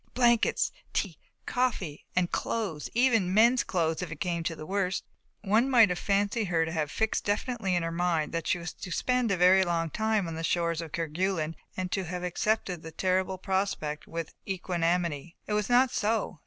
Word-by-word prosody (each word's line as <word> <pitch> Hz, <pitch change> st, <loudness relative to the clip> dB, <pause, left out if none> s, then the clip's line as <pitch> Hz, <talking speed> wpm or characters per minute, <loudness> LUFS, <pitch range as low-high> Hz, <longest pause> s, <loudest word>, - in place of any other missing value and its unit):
Blankets! 240 Hz, -2 st, +3 dB, 0.2 s
Tea! -, -, -2 dB, 0.3 s
Coffee! 225 Hz, -, -1 dB
and 180 Hz, -1 st, +1 dB
clothes 200 Hz, -10 st, -2 dB
even 230 Hz, -7 st, +3 dB
mens' 235 Hz, +5 st, +5 dB
clothes 165 Hz, -3 st, 0 dB
if 180 Hz, -3 st, -5 dB
it 155 Hz, -, -7 dB
came 170 Hz, -2 st, -1 dB
to 165 Hz, 0 st, -2 dB
the 155 Hz, -, -8 dB
worst. 190 Hz, 0 st, -1 dB, 0.4 s
One 220 Hz, +6 st, +3 dB
might 235 Hz, -6 st, +6 dB
have 180 Hz, -1 st, -2 dB
fancied 205 Hz, +2 st, +1 dB
her 165 Hz, -3 st, +1 dB
to 160 Hz, -, -4 dB
have 155 Hz, -3 st, -1 dB
fixed 220 Hz, +6 st, 0 dB
definitely 205 Hz, -2 st, -1 dB
in 175 Hz, -, +1 dB
her 165 Hz, -, -2 dB
mind 165 Hz, -3 st, 0 dB
that 165 Hz, -1 st, -3 dB
she -, -, +2 dB
was 175 Hz, 0 st, -6 dB
to 190 Hz, -, -8 dB
spend 250 Hz, +4 st, +1 dB
a 195 Hz, -, +1 dB
very 185 Hz, +2 st, +6 dB
long 165 Hz, -2 st, -1 dB
time 220 Hz, -2 st, 0 dB
on 165 Hz, -, -4 dB
the 165 Hz, +1 st, -5 dB
shores 170 Hz, 0 st, 0 dB
of 165 Hz, -2 st, -8 dB
Kerguelen 165 Hz, 0 st, -1 dB, 0.2 s
and 185 Hz, -1 st, -3 dB
to 190 Hz, -2 st, -1 dB
have 180 Hz, +1 st, -5 dB
accepted 180 Hz, -1 st, -1 dB
the 160 Hz, -, -8 dB
terrible 185 Hz, +2 st, 0 dB
prospect 190 Hz, -6 st, -2 dB
with 165 Hz, -1 st, -5 dB
equanimity. 175 Hz, -4 st, -1 dB
It 210 Hz, -, -3 dB
was 210 Hz, +1 st, 0 dB
not 250 Hz, +1 st, +5 dB
so. 210 Hz, -6 st, -1 dB
180 Hz, 195 wpm, -29 LUFS, 165-210 Hz, 0.4 s, might